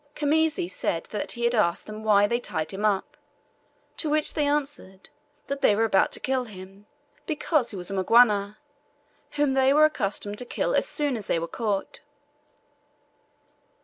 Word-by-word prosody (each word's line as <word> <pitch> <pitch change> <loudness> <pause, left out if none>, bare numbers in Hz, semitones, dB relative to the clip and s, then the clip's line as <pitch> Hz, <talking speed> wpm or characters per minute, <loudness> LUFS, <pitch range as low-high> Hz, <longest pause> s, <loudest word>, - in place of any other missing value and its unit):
Khamisi 310 - +1
said 170 -2 -2
that 210 - -3
he 235 0 0
asked 190 -7 +1
them 215 0 -8
why 205 -2 +4
they 235 +3 0
tied 160 -9 -4
him 200 +1 -6
up, 205 -3 0 0.8
to 310 - -1
which 305 0 +2
they 295 -2 0
answered, 285 -10 -3 0.3
that 280 0 -4
they 205 - +4
were 225 - +1
about 195 -4 +2
to - - 0
kill 260 -1 -1
him, 195 -1 -13 0.4
because 305 -4 0
he - - -5
was 180 +1 -2
a - - -3
Mgwana, 205 +1 +3 0.8
whom 290 -2 +1
they 265 0 +3
were 305 +1 +7
accustomed 205 -7 -2
to - - -1
kill - - -2
as - - +1
soon 290 -3 -1
as 215 -4 -6
they - - +1
were 165 0 -3
caught. 205 +2 -3
220 Hz, 170 wpm, -25 LUFS, 195-285 Hz, 0.8 s, were